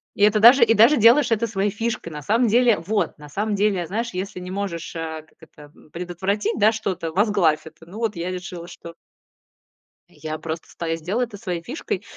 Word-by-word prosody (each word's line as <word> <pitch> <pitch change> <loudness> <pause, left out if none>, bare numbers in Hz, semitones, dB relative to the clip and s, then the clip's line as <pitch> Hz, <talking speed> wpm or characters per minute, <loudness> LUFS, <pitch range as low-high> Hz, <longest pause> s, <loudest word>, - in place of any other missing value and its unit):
И 205 - 0
это 210 +1 +4
даже 240 +5 +8
и 225 -1 +4
даже 230 +7 +6
делаешь 235 +5 +5
это 225 +1 +1
своей 205 -1 -1
фишкой. 225 -5 -4
На 150 - -6
самом 230 - +2
деле, 235 -1 +3
вот 205 +6 -2
на 150 -1 -13
самом 205 +7 -2
деле, 200 -3 +1
знаешь, 230 +4 -3
если 185 0 -5
не 180 0 -8
можешь, 190 -5 -5
э, 160 -1 -5
как - - -30
это, 155 -1 -17
м, - - -20
предотвратить, 180 +4 -2
да, 215 +1 +5
что-то, 190 -7 -3
возглавь 195 -6 +2
это. 160 +1 -14
Ну 180 +5 -11
вот 225 -3 -1
я 170 +2 -3
решила, 180 -2 -7
что 170 -1 -11 1.1
я 155 0 -7
просто 165 +1 -6
стою, 165 -1 -3
и - - -3
сделай 195 +10 -1
это 220 -3 -10
своей 180 -5 -4
фишкой. 270 - -4
195 Hz, 205 wpm, -22 LUFS, 170-220 Hz, 1.1 s, даже